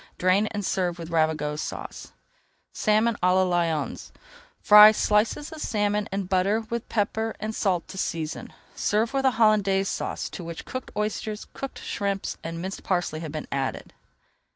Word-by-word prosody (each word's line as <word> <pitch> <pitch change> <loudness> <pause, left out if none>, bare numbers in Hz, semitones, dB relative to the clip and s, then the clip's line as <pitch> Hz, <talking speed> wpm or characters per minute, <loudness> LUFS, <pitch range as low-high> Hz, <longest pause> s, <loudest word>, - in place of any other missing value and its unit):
Drain 185 +4 +3
and 205 -2 -4
serve 180 -2 0
with 170 -1 -8
Ravigote 155 -2 0
Sauce. - - -6 0.6
SALMON 215 +2 +2
À 180 +1 +4
LA 190 - +4
LYONS 170 -4 -1 0.5
Fry 210 +1 +9
slices 215 +8 +1
of 315 -1 -8
salmon 210 -1 0
in 195 0 -1
butter 190 +4 +1
with 235 -1 -3
pepper 220 +1 -1
and 215 +1 -3
salt 185 -5 0
to 190 - -7
season. 160 -4 -3 0.2
Serve 220 +4 0
with 270 0 0
a 265 - +5
Hollandaise 200 -3 +3
Sauce - - -3
to 180 - -8
which 165 0 -7
cooked 255 - -6
oysters, 210 0 -3
cooked 275 - -6
shrimps, 200 -1 -3
and 165 +1 -5
minced 190 +3 -5
parsley 175 -4 -1
have 160 -2 -6
been 155 -1 -5
added. 135 -1 -3
195 Hz, 160 wpm, -25 LUFS, 170-215 Hz, 0.6 s, Fry